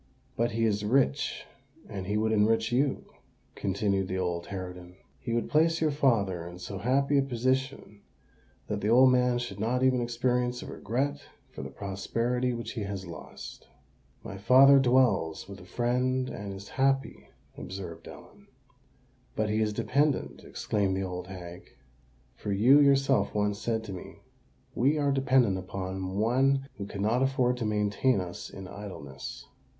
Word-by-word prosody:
"But 115 0 0
he 115 0 +1
is 105 -1 0
rich—and 135 -2 -2
he 105 +1 0
would 110 +1 +1
enrich 110 +1 +2
you," 135 +3 +1 0.5
continued 100 -1 -1
the 95 - -3
old 85 -2 -2
harridan: 90 -2 -7 0.2
"he 120 - -5
would 115 0 0
place 165 +2 +3
your 155 -1 +2
father 100 - +1
in 85 0 -9
so 95 +2 -6
happy 140 +6 +2
a - - +4
position 130 -4 -2 0.6
that 105 -1 -3
the 105 - -1
old 130 +3 +6
man 125 -1 +3
should 120 -5 -5
not 125 +4 0
even 130 -1 +3
experience 125 +1 0
a - - -8
regret 140 +5 -2 0.3
for - - -8
the 70 - -6
prosperity 115 - -2
which 115 -1 -5
he 115 - -5
has 100 -2 -4
lost." 85 - -10 0.6
"My 100 - -7
father 135 +6 +7
dwells 125 -12 +2
with 100 0 -9
a 90 - -13
friend, 125 +5 0
and 100 -1 -6
is 95 +1 -9
happy," 135 0 0 0.3
observed 95 0 -8
Ellen. - - -14 0.9
"But 110 -1 0
he 110 +1 +1
is 105 -1 +1
dependant," 125 - 0
exclaimed 100 -2 -1
the 95 - -1
old 90 -1 -5
hag: 90 -2 -10 0.6
"for 105 - -5
you 120 +9 +6
yourself 135 -7 +3
once 105 0 0
said 110 -1 -1
to 100 -3 -7
me, 90 - -10 0.5
'We 140 +6 +2
are 145 -1 +1
dependant 130 -7 +3
upon 95 0 -5
one 135 +5 +2
who 100 - -4
cannot 110 +6 0
afford 130 -2 +2
to 120 - -3
maintain 105 +3 +1
us 90 -1 -6
in 95 -1 -9
idleness.' 95 -9 -8
110 Hz, 155 wpm, -28 LUFS, 100-130 Hz, 0.9 s, father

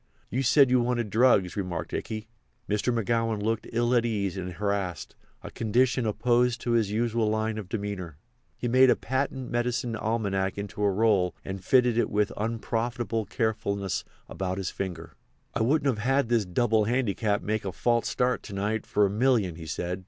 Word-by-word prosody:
"You 130 - 0
said 135 0 +5
you 125 -1 +4
wanted 120 -3 -1
drugs," 110 -6 +4
remarked 90 -4 -4
Ikey. 110 0 -4 0.4
Mr. 105 +4 0
McGowan 115 -1 0
looked 110 +1 -1
ill 120 +1 +1
at 120 -2 +4
ease 100 -5 -1
and 90 -1 -5
harassed—a 100 -2 -4
condition 120 +2 +1
opposed 120 +2 +2
to 120 - -2
his 115 -4 +2
usual 115 0 0
line 110 0 -1
of 95 -4 -8
demeanour. 100 -7 -4 0.4
He 120 - -3
made 130 +2 +6
a 120 - +5
patent 130 0 -3
medicine 120 0 -1
almanac 100 -4 -1
into 100 0 -5
a 100 - +4
roll 100 -3 +2
and 95 -1 -5
fitted 125 +1 +3
it - - +1
with 105 0 +1
unprofitable 115 0 -2
carefulness 100 -3 -1 0.2
about 95 -1 -3
his 95 -1 -3
finger. 90 -4 -5 0.4
"I - - -1
wouldn't 135 -1 +2
have 135 +2 +1
this 115 -4 +2
double 110 +3 +2
handicap 110 -3 0
make 110 +1 -1
a 95 - -3
false 120 +4 +1
start 125 0 0
to 100 - -8
night 105 +3 -2
for 105 - +3
a - - +1
million," 110 -5 +2
he 80 0 -9
said. 90 +3 -3
110 Hz, 175 wpm, -27 LUFS, 100-120 Hz, 0.4 s, made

